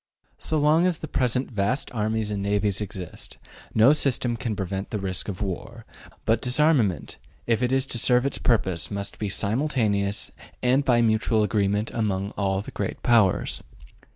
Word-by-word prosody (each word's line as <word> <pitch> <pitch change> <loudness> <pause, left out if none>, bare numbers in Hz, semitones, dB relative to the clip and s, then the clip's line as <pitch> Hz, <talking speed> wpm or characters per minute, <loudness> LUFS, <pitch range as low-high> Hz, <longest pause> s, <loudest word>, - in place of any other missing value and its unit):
So 155 - -1
long 155 +4 +4
as 180 -3 0
the 155 - -7
present 125 -1 0
vast 110 +5 -1
armies 110 -1 -1
and 100 -1 -2
navies 100 0 0
exist, 95 -4 -7 0.4
no 115 +6 +6
system 130 -5 +1
can 115 -2 -3
prevent 95 0 -4
the 110 - -2
risk 95 -2 -3
of 100 +1 -4
war. 110 +4 -6 0.4
But 115 +1 +2
disarmament, 125 - +2 0.3
if 115 0 +1
it 125 0 +1
is 135 0 +2
to 120 - -1
serve 125 +2 +3
its 140 - -1
purpose, 95 -8 +1
must 100 -1 -4
be 105 - -2
simultaneous 105 -3 0 0.3
and 130 +3 +3
by 120 -3 +3
mutual 110 0 +2
agreement 105 0 0
among 100 -3 -1
all 95 -1 -1
the - - -9
Great - - -4
Powers. 110 -6 +3
110 Hz, 165 wpm, -25 LUFS, 100-125 Hz, 0.4 s, no